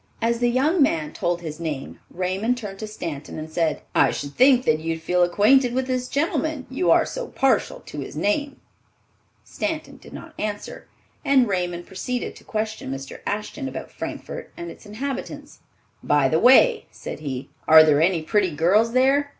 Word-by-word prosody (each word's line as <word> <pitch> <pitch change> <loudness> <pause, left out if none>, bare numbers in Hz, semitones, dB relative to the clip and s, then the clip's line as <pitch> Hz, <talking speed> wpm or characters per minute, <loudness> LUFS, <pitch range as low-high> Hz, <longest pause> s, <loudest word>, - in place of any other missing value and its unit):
As 235 0 0
the 240 0 +2
young 295 +8 +2
man 155 - +1
told 175 0 -1
his 155 -2 -7
name, 155 -5 -5
Raymond 190 +7 -1
turned 200 -4 -7
to 215 - -5
Stanton 165 -9 -6
and 155 0 -7
said, 160 -2 -1
"I - - +4
should 145 0 -5
think 255 -1 +5
that 155 - +3
you'd 165 +1 -3
feel 180 +2 +1
acquainted 235 +8 +4
with 260 0 0
this 255 -1 -2
gentleman, 310 -1 -1
you 270 +7 0
are - - +5
so - - -5
partial 455 - 0
to - - -9
his - - -7
name." 300 -2 -1 0.8
Stanton 315 0 -4
did - - -15
not - - -10
answer, 210 -1 -5 0.4
and 265 -3 +4
Raymond 175 -3 -2
proceeded 245 +6 -4
to - - -16
question 220 - -4
Mr. 135 0 -7
Ashton 215 +7 -3
about - - -7
Frankfort - - -7
and 345 0 -6
its - - -14
inhabitants. 260 +6 -6 0.4
"By 145 -2 +3
the 160 +4 +2
way," 265 - +5
said - - -8
he, 135 -3 -5 0.2
"are 160 0 +9
there 150 -1 +4
any 170 -1 +2
pretty 200 +2 +2
girls 205 +9 +3
there? 270 +3 +3
215 Hz, 175 wpm, -23 LUFS, 165-265 Hz, 0.8 s, are